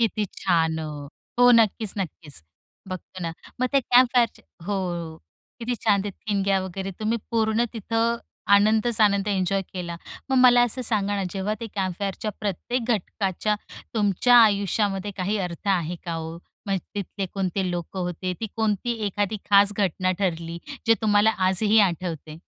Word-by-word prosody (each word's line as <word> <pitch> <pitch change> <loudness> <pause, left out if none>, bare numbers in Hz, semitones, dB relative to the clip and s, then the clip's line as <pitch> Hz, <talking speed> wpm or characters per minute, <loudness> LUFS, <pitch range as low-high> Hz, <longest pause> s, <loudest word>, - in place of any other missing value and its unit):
किती 215 -2 +1
छान 160 -3 +1
हो 155 -1 -4 0.5
हो 245 0 +7
नक्कीच, 220 -2 +3
नक्कीच. 155 - -6 0.5
बघतोना, 185 -2 -6 0.3
मग 255 - +3
ते 275 - +4
कॅम्प 250 0 +5
फायरच 235 -2 +2 0.3
हो. 205 -1 0 0.8
किती 240 +1 -2
छान 200 -3 +3
ते 205 - -3
ठिणग्या 195 -1 0
वगैरे 190 +1 -5
तुम्ही 225 +2 0
पूर्ण 225 0 +2
तिथं 230 +1 0 0.4
आनंदच-आनंद 210 -1 +3
एन्जॉय 195 0 +1
केला. 175 -2 -6 0.3
मग 265 - +3
मला 245 0 +6
असं 255 +3 -4
सांगा 205 -2 +1
ना, 195 - -1
जेव्हा 200 +3 -2
ते 230 - -4
कॅम्प 185 -3 -2
फायरच्या 200 +2 -2
प्रत्येक 215 +5 -2
घटकाच्या, 200 +1 -1 0.4
तुमच्या 215 +3 +4
आयुष्यामध्ये 205 -1 0
काही 195 +3 -1
अर्थ 170 +4 -7
आहे 175 +1 -4
का 170 - -3
हो? 165 0 -5 0.3
मग 195 -1 +1 0.2
तिथले 200 -1 -4
कोणते 190 -1 -1
लोकं 175 +2 -5
होते 180 +1 -3
ती 225 - -2
कोणती 220 +1 0
एखादी 205 +1 -1
खास 200 0 +6
घटना 185 -2 +1
ठरली, 170 -3 -2 0.3
जे 225 - +6
तुम्हाला 210 0 +4 0.2
आजही 210 +3 +3
आठवते? 165 -2 -7
200 Hz, 150 wpm, -24 LUFS, 185-220 Hz, 0.8 s, हो